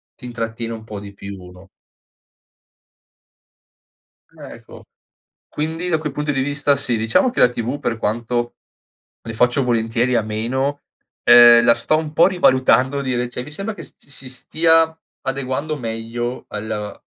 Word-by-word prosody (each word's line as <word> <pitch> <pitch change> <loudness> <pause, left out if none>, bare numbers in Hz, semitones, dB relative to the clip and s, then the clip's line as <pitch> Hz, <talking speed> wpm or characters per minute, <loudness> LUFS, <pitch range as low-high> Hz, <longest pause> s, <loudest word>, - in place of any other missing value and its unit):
ti 125 - -12
intrattiene 115 -1 -5
un 110 - -8
po' 105 -2 -8
di 100 0 -10
più, 100 -2 -10
no? 90 +1 -16 2.7
Ecco. - - -12 0.6
Quindi 160 +4 -3
da 160 -3 +1
quel 150 -3 -5
punto 150 0 -2
di 135 -1 0
vista 145 0 +1
sì, 125 -4 -1
diciamo 115 - +2
che 250 - -3
la 125 - +7
TV 125 +3 -4
per 115 - -2
quanto 120 +3 -2 0.7
ne 115 - -7
faccio 125 +4 +2
volentieri 120 +1 0
a 115 - +2
meno, 130 +7 -2 0.4
ehm, 120 0 +8
la 120 -1 +6
sto 120 +6 +1
un 155 -1 -4
po' 170 +3 +5
rivalutando 130 -6 +3
di 130 -2 -2
rece 120 0 -3
mi 150 - -11
sembra 195 +8 -5
che - - -10
si 135 -1 -10
stia 160 +5 +2 0.2
adeguando 135 +3 -3
meglio 115 0 -5
al 105 -1 -6
125 Hz, 145 wpm, -20 LUFS, 115-145 Hz, 2.7 s, ehm